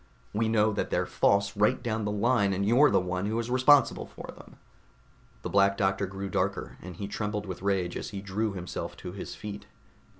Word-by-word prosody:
We 110 +1 +1
know 110 -1 +3
that - - -2
they're - - 0
false 100 0 +2
right 105 +1 +3
down 110 -3 -1
the 105 - -1
line 105 -1 +2
and 95 +1 -1
that - - 0
you're 130 +7 +6
the - - +3
one 90 +1 -2
who 110 +2 -1
is 115 +1 -2
responsible 130 +3 +4
for - - -10
them." - - -15 0.9
The - - -3
Black 100 0 +4
Doctor 95 0 +1
grew 95 +1 -5
darker, 95 - -2
and 90 -1 -9
he 100 +3 -5
trembled 105 0 -3
with 95 -2 -6
rage 95 -3 0
as - - -4
he 100 - -6
drew 105 +2 -2
himself 90 -2 -6
to 90 - -7
his 95 - -7
feet. 105 -1 -8
100 Hz, 210 wpm, -28 LUFS, 95-110 Hz, 0.9 s, you're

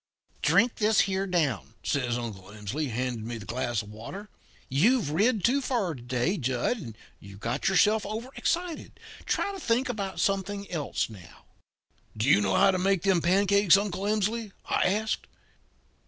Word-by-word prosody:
"'Drink 235 +1 +3
this 215 -1 +4
here 195 0 -1
down,' 145 - -1
says 125 -4 0
Uncle 110 -6 -6
Emsley, 105 +9 -4
handing 120 -1 -3
me 120 0 -4
the 105 - -9
glass 120 0 -2
of 105 - -12
water. 190 - -8 0.4
'You've 190 - +2
rid 210 +5 +2
too 275 +4 +3
far 235 -10 -1
to 130 - -10
day, 125 +10 -1
Jud, 130 - 0
and 100 - -12
got 120 +3 -2
yourself 210 +3 +4
over 220 +4 -5
excited. 345 -1 -2 0.3
Try 400 - 0
to 390 - -7
think 250 -3 +1
about 200 -5 -4
something 200 +1 -1
else 155 -5 -1
now.' 95 -7 -14 0.7
"'Do 110 +4 0
you 105 - +6
know 100 - +1
how 195 +1 +5
to 185 - -1
make 195 -1 +1
them 190 -3 +3
pancakes, 195 +1 +4
Uncle 200 -1 -2
Emsley?' 215 +1 0
I - - +1
asked. 215 +3 0
185 Hz, 165 wpm, -28 LUFS, -, 0.7 s, you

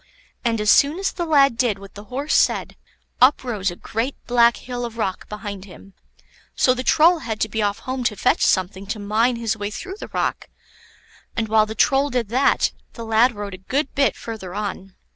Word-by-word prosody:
And 230 -2 0
as 210 -1 +4
soon 285 +4 +4
as 385 0 -1
the 345 -2 -4
lad 275 -5 +4
did 235 -6 +2
what 195 0 -13
the 205 +1 -11
Horse 275 +6 -3
said, - - +2 0.5
up 260 +3 +5
rose 210 -6 -2
a 175 - -7
great 230 +9 -3
black 235 -1 +4
hill 245 -1 -6
of 235 -1 -6
rock 190 -5 -3
behind 200 -2 -7
him. 195 0 -15 0.6
So 255 - +4
the 255 - -4
Troll 325 +6 +4
had 220 -8 -5
to - - +2
be 220 +1 -3
off 205 0 0
home 255 +2 -4
to 220 - +1
fetch - - +1
something 190 +1 +1
to 215 - -3
mine 215 +4 +1
his 230 -2 -1
way 205 -1 -4
through 380 - -7
the - - -7
rock; - - -2 0.9
and 225 -1 0
while 215 0 +3
the 220 - -6
Troll 275 +4 +3
did 245 -5 -2
that, 255 +4 +2 0.2
the 230 - -8
lad 225 +2 +3
rode 205 -1 -6
a - - -7
good 265 +9 -2
bit 275 -1 +2
further 205 -5 -7
on. 195 -2 -5
225 Hz, 210 wpm, -22 LUFS, 205-255 Hz, 0.9 s, up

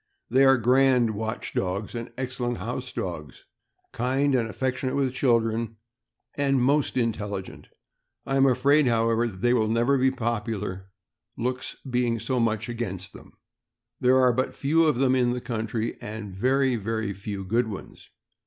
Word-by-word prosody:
They 135 +2 +5
are 135 0 +6
grand 125 -1 +4
watch 110 +2 -4
dogs 95 +3 -2
and 115 -1 -6
excellent 125 -2 -3
house - - -5
dogs, 75 -4 -6 0.5
kind 135 +4 +1
and 115 -3 +1
affectionate 130 +3 -2
with 135 -3 0
children, 115 -3 +1 0.6
and 135 -2 +1
most 140 +2 +2
intelligent. 105 -5 -3 0.6
I 135 - -1
am 135 0 +5
afraid, 135 +3 +4
however, 115 0 +2
that 95 -4 -9
they 120 0 +3
will 110 -3 +2
never 120 +5 +2
be 130 +1 +4
popular, 105 -6 -3 0.5
looks 125 +2 -3
being 120 -2 +1
so 125 +3 -1
much 110 -1 0
against 105 -6 -5
them. - - -14 0.7
There 130 +1 +4
are 125 -1 +4
but 130 +2 -1
few 160 +4 +2
of 150 -4 +3
them 130 +1 +2
in 125 -2 +3
the 125 +1 -1
country, 115 -1 -3
and 105 -2 -7
very, 130 +5 +2
very 110 -1 -2
few 100 0 -6
good 115 +4 +1
ones. 100 -3 -9
120 Hz, 155 wpm, -26 LUFS, 110-130 Hz, 0.7 s, are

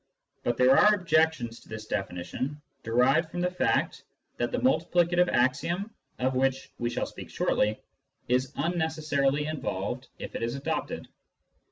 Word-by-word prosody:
But 120 -1 -1
there 130 +1 +6
are 210 +6 +6
objections 160 - +1
to - - -20
this 110 -1 -6
definition, 95 +9 -3 0.2
derived 130 +8 +3
from 175 +1 -4
the 180 0 +1
fact 180 - 0 0.3
that - - -1
the - - 0
multiplicative 175 -6 +3
axiom 170 - +1 0.2
(of 130 +1 0
which 135 +1 0
we 120 - 0
shall - - -2
speak - - -9
shortly) 105 +1 +1 0.5
is 125 +1 +1
unneces 160 -3 -2
sarily 140 +1 +2
involved 125 -4 -3
if - - -7
it - - -4
is 115 +3 -1
adopted. 140 - -3
135 Hz, 150 wpm, -28 LUFS, 120-165 Hz, 0.5 s, there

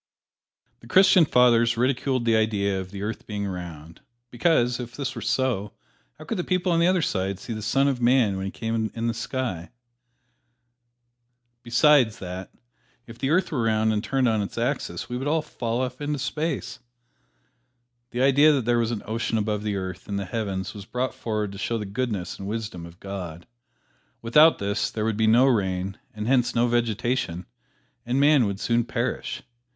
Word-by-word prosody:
The - - -15
Christian 185 -2 +6
Fathers 120 -3 +4
ridiculed 130 0 0
the 115 -1 +3
idea 100 -3 +1
of 95 - -9
the 100 +1 -7
earth 110 +2 -5
being 105 -1 -3
round, 85 -4 -7 0.3
because, 125 -2 +2
if 120 -1 -7
this 135 -2 -3
were 115 - -7
so, 115 -3 -1 0.4
how 155 - -11
could 195 +4 -3
the - - 0
people 185 0 0
on 165 - +3
the 170 - +4
other 185 -2 +2
side 95 -4 -1
see 115 - -6
the 110 - -5
Son 135 +6 +2
of 130 -3 -1
Man 120 -4 +3
when 95 0 -3
He - - -4
came 115 -1 -2
in 115 0 -3
the 115 - +1
sky? 115 -7 -4 1.9
Besides 120 -1 +4
that, 90 -1 -7 0.5
if 115 0 -12
the 135 - -1
earth 180 +5 +2
were 140 -6 0
round 110 -1 +2
and 105 0 -1
turned 135 -1 +1
on 110 -2 +2
its 100 - -6
axis, 125 +5 -2
we 125 - -4
would 135 +3 -3
all 155 +1 +1
fall 120 -4 -3
off 130 +1 -4
into 145 0 -1
space. 145 -3 -3 1.3
The 125 +2 -1
idea 140 +3 +6
that 135 -5 0
there 120 0 +2
was 115 -1 +1
an 115 -3 -4
ocean 110 +1 -1
above 105 -1 -1
the 105 -1 -2
earth, 95 -1 -6
in 100 - -2
the 100 - -3
heavens, 95 -2 -3
was 100 -2 -9
brought 125 +4 -2
forward 105 -3 -3
to 100 - -9
show 115 +3 -1
the 105 - -4
goodness 100 -3 -3
and 95 - -6
wisdom 105 -6 -5
of 85 +2 -16
God. 90 -4 -7 0.8
Without 150 +8 +6
this 100 +1 -1
there 110 -1 -3
would 110 -1 0
be 110 +1 +2
no 120 +4 +6
rain 95 -6 0
and 105 0 -6
hence 125 -1 +2
no 120 +1 +3
vegetation, 120 -5 -1 0.6
and 125 +3 0
man 140 -5 +5
would 100 -1 -4
soon 120 +2 +1
perish. 120 +1 -3
115 Hz, 190 wpm, -25 LUFS, 100-130 Hz, 1.9 s, Christian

